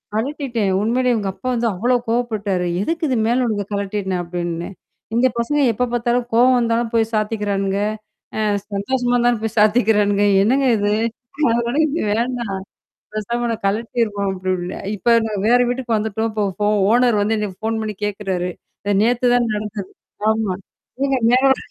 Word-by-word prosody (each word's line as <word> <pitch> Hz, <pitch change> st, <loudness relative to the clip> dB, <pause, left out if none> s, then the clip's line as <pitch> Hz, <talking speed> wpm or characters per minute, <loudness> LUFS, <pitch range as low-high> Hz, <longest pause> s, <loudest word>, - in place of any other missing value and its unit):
கழட்டிட்டேன். 240 Hz, -4 st, -1 dB
உண்மையிலேயே 245 Hz, +3 st, +2 dB
இவங்க 205 Hz, -3 st, -1 dB
அப்பா 195 Hz, +7 st, -8 dB
வந்து 235 Hz, -1 st, 0 dB
அவ்வளோ 240 Hz, +7 st, +1 dB
கோபப்பட்டாரு. 215 Hz, -6 st, -1 dB, 0.2 s
எதுக்கு 330 Hz, -, -2 dB
இது 260 Hz, -, +1 dB
மேல 250 Hz, +2 st, +2 dB
உள்ளத 210 Hz, -3 st, -1 dB
கழட்ன? 200 Hz, -2 st, -2 dB
அப்படின்னு. 170 Hz, -1 st, -4 dB, 0.5 s
இந்த 245 Hz, +2 st, +4 dB
பசங்க 265 Hz, +6 st, 0 dB
எப்ப 250 Hz, +4 st, 0 dB
பார்த்தாலும் 240 Hz, 0 st, +1 dB
கோவம் 250 Hz, +2 st, +5 dB
வந்தாலும் 230 Hz, 0 st, 0 dB
போய் 225 Hz, -1 st, +1 dB
சாத்திக்கிறானுங்க. 205 Hz, -2 st, -1 dB, 0.6 s
அ -, -, -1 dB, 0.3 s
சந்தோஷமா 245 Hz, +5 st, 0 dB
இருந்தாலும் 240 Hz, -2 st, +2 dB
போய் 225 Hz, +1 st, -3 dB
சாத்திக்கிறானுங்க. 210 Hz, -2 st, +3 dB, 0.2 s
என்னங்க 260 Hz, +7 st, +3 dB
இது! 205 Hz, 0 st, +1 dB, 0.6 s
அதனால 235 Hz, +2 st, 0 dB
இது 310 Hz, +3 st, -2 dB
வேண்டாம். 235 Hz, -2 st, -2 dB, 0.6 s
பேசாம 235 Hz, +3 st, -2 dB
நான் 225 Hz, 0 st, -5 dB
கழட்டிருவோம் 210 Hz, -1 st, 0 dB
அப்டீன்னேன். 185 Hz, -1 st, -3 dB
இப்ப 235 Hz, +4 st, +2 dB
நான் 210 Hz, -3 st, -3 dB
வேற 245 Hz, +2 st, +5 dB
வீட்டுக்கு 245 Hz, -2 st, -1 dB
வந்துட்டோம். 220 Hz, +1 st, -2 dB
போ 210 Hz, -, +2 dB, 0.2 s
ஃபோ 205 Hz, -, +2 dB, 0.2 s
ஓனர் 240 Hz, -2 st, +4 dB
வந்து 215 Hz, +2 st, +1 dB
எனக்குப் 205 Hz, -3 st, -4 dB
ஃபோன் 225 Hz, 0 st, 0 dB
பண்ணி 215 Hz, -1 st, -4 dB
கேக்குறாரு. 195 Hz, -3 st, -2 dB, 0.5 s
நேத்து 245 Hz, +2 st, +2 dB
தான் 240 Hz, -2 st, +2 dB
நடந்தது. 210 Hz, -2 st, -5 dB, 0.4 s
ஆமா. 220 Hz, -4 st, -1 dB, 0.5 s
நீங்க 275 Hz, -1 st, +2 dB
மேல 255 Hz, +2 st, +4 dB
ஒரு -, -, -9 dB
220 Hz, 150 wpm, -20 LUFS, 205-240 Hz, 0.6 s, கோவம்